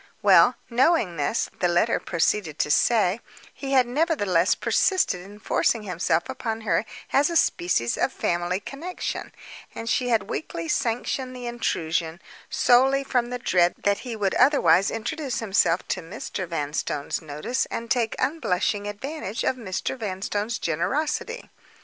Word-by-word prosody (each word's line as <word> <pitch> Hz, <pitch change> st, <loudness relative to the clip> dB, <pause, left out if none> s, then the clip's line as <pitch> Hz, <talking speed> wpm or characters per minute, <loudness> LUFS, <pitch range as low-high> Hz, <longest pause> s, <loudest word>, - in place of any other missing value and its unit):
Well -, -, +6 dB
knowing 240 Hz, -, +2 dB
this 145 Hz, +10 st, 0 dB
(the 180 Hz, -, +2 dB
letter 175 Hz, +7 st, +2 dB
proceeded 170 Hz, -2 st, 0 dB
to 150 Hz, -, 0 dB
say), 215 Hz, +1 st, +3 dB, 0.3 s
he 275 Hz, -1 st, -5 dB
had 260 Hz, -2 st, +5 dB
nevertheless 240 Hz, -, +2 dB
persisted 365 Hz, -, +1 dB
in 200 Hz, +3 st, -12 dB
forcing 215 Hz, +1 st, 0 dB
himself 175 Hz, -3 st, 0 dB
upon 230 Hz, -4 st, -4 dB
her 220 Hz, 0 st, +1 dB, 0.3 s
as 285 Hz, +3 st, +4 dB
a 340 Hz, -, -3 dB
species 175 Hz, -, +1 dB
of -, -, +1 dB
family 175 Hz, +2 st, -1 dB
connection: 315 Hz, -, -5 dB, 0.4 s
and 230 Hz, -, -6 dB
she 250 Hz, +1 st, +1 dB
had 225 Hz, -4 st, +2 dB
weakly 165 Hz, 0 st, -4 dB
sanctioned 250 Hz, +5 st, -1 dB
the 250 Hz, -1 st, -7 dB
intrusion, 165 Hz, -8 st, -2 dB, 0.3 s
solely 265 Hz, +1 st, +4 dB
from 245 Hz, -3 st, 0 dB
the 250 Hz, -, -3 dB
dread 180 Hz, -7 st, +2 dB
that 200 Hz, 0 st, +2 dB
he 245 Hz, -3 st, -6 dB
would 200 Hz, -3 st, 0 dB
otherwise 255 Hz, -7 st, +4 dB
introduce 265 Hz, +4 st, -3 dB
himself 195 Hz, -7 st, +1 dB
to 185 Hz, -, -1 dB
Mr. 185 Hz, +1 st, -6 dB
Vanstone's 150 Hz, -2 st, -3 dB
notice, 155 Hz, -, -2 dB
and 230 Hz, 0 st, -5 dB
take 235 Hz, -3 st, +1 dB
unblushing 205 Hz, -, 0 dB
advantage 225 Hz, +1 st, -5 dB
of -, -, +1 dB
Mr. 220 Hz, -1 st, -3 dB
Vanstone's 210 Hz, 0 st, -3 dB
generosity. 300 Hz, -, -2 dB
220 Hz, 145 wpm, -25 LUFS, 180-255 Hz, 0.4 s, Well